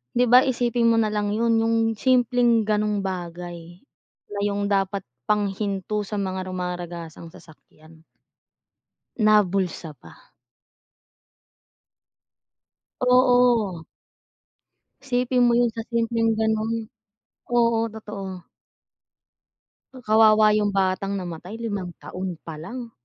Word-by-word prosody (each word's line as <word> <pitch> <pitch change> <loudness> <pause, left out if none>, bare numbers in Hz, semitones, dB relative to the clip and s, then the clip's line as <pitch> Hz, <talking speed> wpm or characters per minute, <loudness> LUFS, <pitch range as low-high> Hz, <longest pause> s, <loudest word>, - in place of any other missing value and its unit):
'Di 245 - +4
ba, 250 - +9
isipin 240 -1 +1
mo 230 - +4
nalang 210 -2 0
'yun, 230 +1 +2
yung 225 0 +1 0.2
simpleng 245 -2 +3
ganong 210 -1 0
bagay, 175 -1 -7 0.5
na 205 - -4
yung 200 0 -1
dapat 195 0 0 0.2
pang 210 -2 +1
hinto 200 +1 -3
sa 210 - -5
mga 190 -2 -3
rumaragasang 175 -2 -6
sasakyan, 160 0 -18 1.2
nabulsa 190 -6 +1
pa. - - -18 2.7
Oo. 245 -8 +3 1.2
Isipin 250 -1 0
mo 240 - +4
'yun 240 -1 +3
sa 225 - -3
simpleng 230 -1 +1
ganun, 220 +1 0 0.8
oo' 230 -1 +2
totoo. 200 -4 -7 1.7
Kawawa 215 0 +5
yung 205 -1 -1
batang 195 +1 0
namatay 180 +1 -6
limang 205 -6 -5
taon 185 -1 -5
pa 160 -2 -8
lang. 235 +8 -8
210 Hz, 100 wpm, -23 LUFS, 185-230 Hz, 2.7 s, ba